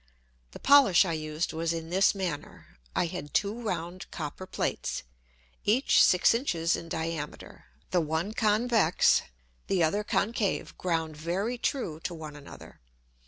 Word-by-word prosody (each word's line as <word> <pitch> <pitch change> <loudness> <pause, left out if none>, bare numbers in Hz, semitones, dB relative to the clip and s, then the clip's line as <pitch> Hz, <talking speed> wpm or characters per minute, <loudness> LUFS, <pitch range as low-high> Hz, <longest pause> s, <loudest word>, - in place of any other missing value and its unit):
The - - -11
Polish 275 -10 +6
I 170 - -1
used 155 +1 -3
was 165 +1 -1
in 165 0 -6
this 190 +3 +4
manner. 170 - -6 0.2
I - - +2
had 165 -4 -6
two 210 +4 0
round 180 -4 -4
Copper 160 +4 -6
Plates, - - -2 0.6
each 240 +7 +4
six 180 +4 +5
Inches 175 - 0
in 165 - -7
Diameter, 160 -2 -5 0.3
the 180 - +3
one 160 +6 -2
convex, 220 -4 +3 0.5
the 185 -3 +2
other 200 +7 +1
concave, 210 -1 -1
ground 165 -3 -1
very 190 +10 -2
true 210 - -2
to 170 +1 -5
one 155 -2 -8
another. 145 -1 -12
175 Hz, 140 wpm, -28 LUFS, 160-205 Hz, 0.6 s, Polish